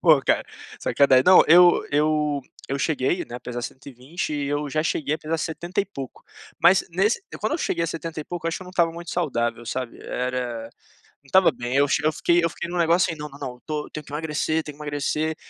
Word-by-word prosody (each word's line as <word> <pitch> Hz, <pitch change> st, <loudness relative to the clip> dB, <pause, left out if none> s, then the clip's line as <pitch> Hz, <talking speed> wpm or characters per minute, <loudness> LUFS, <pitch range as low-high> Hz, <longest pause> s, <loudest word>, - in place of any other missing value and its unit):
Pô, 155 Hz, -5 st, +6 dB
ca -, -, +2 dB, 0.4 s
sacana 135 Hz, -2 st, +4 dB
Não, 185 Hz, 0 st, +8 dB
eu 175 Hz, +2 st, +7 dB
eu 150 Hz, -1 st, +1 dB, 0.3 s
eu 140 Hz, -, -2 dB
cheguei, 150 Hz, +3 st, 0 dB
né, 120 Hz, -, -11 dB
a 125 Hz, -, -6 dB
pesar 120 Hz, 0 st, -5 dB
120. 135 Hz, +6 st, -6 dB
E 145 Hz, -1 st, -2 dB
eu, 145 Hz, +1 st, -1 dB
já, 155 Hz, +2 st, 0 dB
cheguei 155 Hz, -2 st, 0 dB
a -, -, -5 dB
pesar 160 Hz, +1 st, -2 dB
setenta 170 Hz, +4 st, -2 dB
e -, -, -1 dB
pouco. 135 Hz, -10 st, -9 dB, 0.4 s
Mas, 190 Hz, +2 st, +5 dB
nes 195 Hz, +6 st, +1 dB, 0.2 s
quando -, -, -1 dB
eu -, -, -2 dB
cheguei 170 Hz, -, -1 dB
a -, -, 0 dB
setenta 165 Hz, -1 st, -5 dB
e -, -, -7 dB
pouco, 175 Hz, 0 st, -5 dB
eu -, -, +2 dB
acho 165 Hz, -, -2 dB
que -, -, -9 dB
eu -, -, -11 dB
não 180 Hz, -, -10 dB
estava 170 Hz, -2 st, +2 dB
muito 170 Hz, 0 st, -8 dB
saudável, 120 Hz, -8 st, -1 dB
sabe. 125 Hz, +1 st, -4 dB
Era, 125 Hz, -2 st, -3 dB, 0.6 s
não -, -, -37 dB
estava 190 Hz, +6 st, +5 dB
bem. 120 Hz, +1 st, -5 dB
Eu 145 Hz, -, +4 dB
che 145 Hz, -, 0 dB
eu 155 Hz, -, +4 dB
fiquei 170 Hz, +3 st, +2 dB
eu 170 Hz, -, +2 dB
fiquei 170 Hz, +1 st, -6 dB
num 180 Hz, -, -3 dB
negócio, 170 Hz, +1 st, +3 dB
aí, 160 Hz, -, -7 dB
"não, 150 Hz, 0 st, -6 dB
não, 140 Hz, 0 st, -14 dB
não, 125 Hz, -3 st, -6 dB
tô 150 Hz, -1 st, -4 dB
tenho 155 Hz, -1 st, -8 dB
que 145 Hz, -, -13 dB
emagrecer, 155 Hz, +1 st, -1 dB
tenho 150 Hz, -2 st, -9 dB
que 150 Hz, -, -8 dB
emagrecer.". 150 Hz, +2 st, -1 dB
155 Hz, 240 wpm, -24 LUFS, 140-170 Hz, 0.6 s, Não